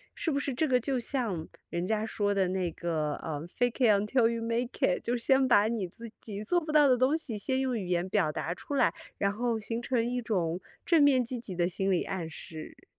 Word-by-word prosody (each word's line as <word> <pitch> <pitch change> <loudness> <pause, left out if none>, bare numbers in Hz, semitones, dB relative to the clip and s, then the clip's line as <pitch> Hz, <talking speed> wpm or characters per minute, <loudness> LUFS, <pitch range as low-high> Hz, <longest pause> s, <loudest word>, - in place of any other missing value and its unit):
是 325 - -1
不 280 - +1
是 285 - -2
这 310 +6 +1
个 255 -2 +3
就 260 +2 -1
像 230 - -2 0.2
人 170 +1 -2
家 215 +2 0
说 205 -2 0
的 195 -2 +2
那 185 -2 -1
个， 155 -3 -2
呃， 155 0 -5
Fake 245 +6 -1
it 220 - +6
untill 225 +3 +3
you 230 0 -2
make 230 +2 0
it 180 - +2
就 240 - 0
先 265 +2 +3
把 210 -4 +5
你 220 -5 -2
自 230 +6 -10
己 205 -1 -6
做 350 +11 +2
不 310 -2 -5
到 300 -1 +6
的 255 -2 +4
东 260 +5 +3
西 265 -9 -3
先 260 +6 0
用 260 -2 0
语 200 - -4
言 175 0 0
表 185 -6 +2
达 165 +2 -3
出 285 - -7
来， 210 -11 +4 0.3
然 200 - +2
后 230 +2 -1
形 230 +2 -3
成 240 -1 0
一 245 +1 -1
种 180 -7 -1 0.3
正 335 -4 +5
面 265 -3 +5
积 245 +1 -3
极 200 -5 -6
的 175 0 +2
心 190 +2 -1
理 180 - +2
暗 180 -4 -4
示。 160 0 -10
225 Hz, 325 characters per minute, -29 LUFS, 185-255 Hz, 0.3 s, it